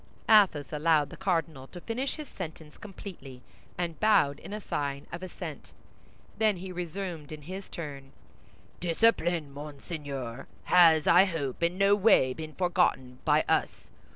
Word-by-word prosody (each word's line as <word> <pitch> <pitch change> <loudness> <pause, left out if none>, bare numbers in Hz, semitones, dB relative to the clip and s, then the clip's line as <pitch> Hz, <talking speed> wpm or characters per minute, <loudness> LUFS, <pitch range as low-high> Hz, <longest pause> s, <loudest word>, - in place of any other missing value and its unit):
Athos 190 -10 +4
allowed 150 -1 +2
the - - -8
cardinal 165 -8 -2
to 175 - -10
finish 245 +8 -3
his 305 -2 -8
sentence 160 -6 -8
completely, 175 - -10 0.3
and 170 -2 -3
bowed 150 -10 +3
in 210 +1 -7
sign 140 -7 -3
of 170 - -6
assent. 185 - -8 0.7
Then 215 -3 +3
he 185 +1 -7
resumed 175 -3 -5
in 155 -1 -8
his 190 +5 -8
turn: 140 -5 -7 0.7
"Discipline, 175 -4 +1
Monseigneur, 140 -4 -7 0.2
has, 165 -4 +6
I 180 +3 +7
hope, 155 -8 -4
in 170 +2 +1
no 195 +1 +4
way 195 - +4
been 155 +1 -8
forgotten 175 -9 0
by - - +3
us. - - -1
165 Hz, 140 wpm, -29 LUFS, 145-190 Hz, 0.7 s, I